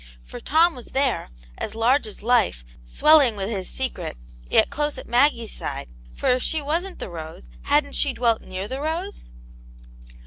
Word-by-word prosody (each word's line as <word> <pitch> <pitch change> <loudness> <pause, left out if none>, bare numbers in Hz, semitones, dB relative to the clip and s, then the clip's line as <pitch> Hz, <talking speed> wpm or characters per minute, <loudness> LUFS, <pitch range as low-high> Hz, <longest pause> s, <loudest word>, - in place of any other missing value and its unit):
For - - -9
Tom 330 +3 +3
was 250 -2 -10
there, 265 - 0 0.3
as - - -4
large 235 +3 +2
as 210 - -8
life, 230 - +2 0.2
swelling 275 - +5
with 200 +2 -3
his 190 -4 -3
secret, 260 - -4 0.3
yet - - +4
close 295 0 -1
at - - -8
Maggie's 240 -2 +2
side, - - -5 0.3
for - - -1
if 250 0 +3
she 320 - 0
wasn't 335 +6 -2
the - - -6
rose, 165 +1 -9
hadn't 285 0 +2
she 285 - +3
dwelt 235 -3 +1
near 185 +2 -6
the 265 +4 -5
rose 335 +6 -4
250 Hz, 170 wpm, -23 LUFS, 215-295 Hz, 0.3 s, swelling